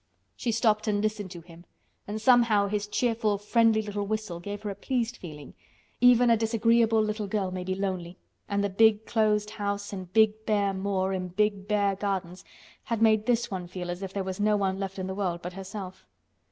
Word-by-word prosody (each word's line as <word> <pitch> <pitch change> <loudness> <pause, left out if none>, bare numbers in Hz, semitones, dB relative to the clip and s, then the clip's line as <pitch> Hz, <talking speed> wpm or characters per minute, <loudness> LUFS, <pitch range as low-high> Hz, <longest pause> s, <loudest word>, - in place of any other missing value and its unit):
She 240 - -2
stopped 215 -1 +1
and 205 -1 +1
listened 210 -2 -2
to 175 -2 -9
him 170 0 -15 0.4
and 210 +1 -4
somehow 230 -3 +4
his 205 0 -2
cheerful, 225 -2 0
friendly 220 +1 +3
little 205 -1 -4
whistle 215 -5 -3
gave 205 +3 -6
her 205 - -3
a - - -6
pleased 245 +3 -2
feeling—even 230 - 0
a - - +6
disagreeable 225 0 +3
little 215 -1 -2
girl 195 -2 -1
may 185 0 -4
be 185 +1 -2
lonely, 185 -2 -3 0.3
and 200 0 0
the 200 - 0
big 220 +2 +4
closed 210 -2 +1
house 205 -1 -3
and 185 -2 -7
big 220 +1 +3
bare 205 -2 +2
moor 190 0 -1
and 180 -1 -4
big 205 -1 0
bare 205 -2 +2
gardens 190 -3 -3 0.4
had 230 -2 -2
made 220 -1 +3
this 240 -2 +1
one 180 -2 -4
feel 180 0 -5
as 175 +2 -6
if 195 -1 -5
there 195 0 -3
was 190 0 -5
no 210 0 +3
one 190 -1 -1
left 195 0 -4
in 185 - -3
the 190 - -4
world 180 -3 -2
but 180 +1 -5
herself. 190 0 -8
205 Hz, 200 wpm, -27 LUFS, 190-220 Hz, 0.4 s, a